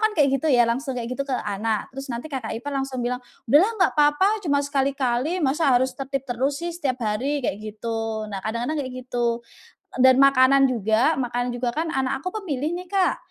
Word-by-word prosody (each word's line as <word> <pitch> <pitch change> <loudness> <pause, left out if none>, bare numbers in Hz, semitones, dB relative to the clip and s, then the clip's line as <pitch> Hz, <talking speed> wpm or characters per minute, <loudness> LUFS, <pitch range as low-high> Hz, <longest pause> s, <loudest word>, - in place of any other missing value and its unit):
kan 435 -1 +2
kayak 290 -2 +4
gitu 320 - 0
ya, 245 -4 +5
langsung 255 +3 -2
kayak 240 0 -4
gitu 275 +2 -4
ke 260 - 0
anak. 215 +1 -2
Terus 270 +2 -7
nanti 245 +5 -6
kakak 245 -5 -3
ipar 285 +5 -6
langsung 270 -2 -2
bilang, 250 +1 -2 0.2
"Udahlah 295 - +5 0.2
nggak - - +1
papa 380 +9 +3
cuma 285 -5 +1
sekali-kali, 275 +3 0
masa 285 +3 +2
harus 260 +1 +1
tertib 270 0 -4
terus 265 +3 -1
sih 345 +3 -4
setiap 285 -7 -2
hari." 260 +7 -1
kayak 205 - -2
gitu. 220 0 -4
Nah 195 - -4
kadang-kadang 235 +9 -2
kayak 260 -2 -5
gitu, - - -40 1.0
dan 260 0 +7
makanan 275 0 +6
juga, 230 +5 +2
makanan 245 -1 -1
juga 245 0 -2
kan 320 +4 -2
anak 265 -2 -1
aku 365 - -3 0.2
pemilih 305 0 -2
nih 360 +1 -7
Kak. 385 -2 +2
265 Hz, 200 wpm, -23 LUFS, 240-290 Hz, 1.0 s, dan